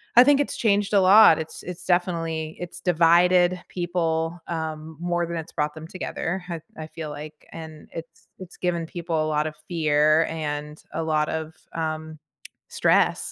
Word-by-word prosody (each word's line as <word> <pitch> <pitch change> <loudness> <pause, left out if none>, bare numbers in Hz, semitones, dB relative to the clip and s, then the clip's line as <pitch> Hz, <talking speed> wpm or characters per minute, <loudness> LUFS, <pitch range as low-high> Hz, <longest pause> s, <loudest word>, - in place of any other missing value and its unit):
I 245 - +10
think 285 +1 +5
it's 290 - -1
changed 205 -2 +2
a 200 - +6
lot, 190 -3 +8
it's 160 - -7
it's 180 0 -7
definitely 165 -3 -1
it's 175 0 -7
divided 175 +1 +4
people, 170 -1 -1
um, 160 -1 -5
more 175 0 0
than 170 0 -4
it's 160 0 -6
brought 150 0 -1
them 160 +1 -9
together, 185 0 -4
I 170 -2 -4 0.2
I 155 0 -6
feel 160 -1 -7
like, 150 +1 -10
and 160 -2 -10
it's 165 0 -10
it's 185 -2 -11
given 170 -2 -1
people 165 -2 -2
a - - -1
lot 150 0 +1
of 155 - -7
fear 155 -2 +3
and 150 -1 -4
a 165 +1 -2
lot 155 -1 +1
of, 160 0 -4 0.2
um, 155 -1 -4 0.5
stress, - - +2
165 Hz, 170 wpm, -24 LUFS, 155-175 Hz, 0.5 s, I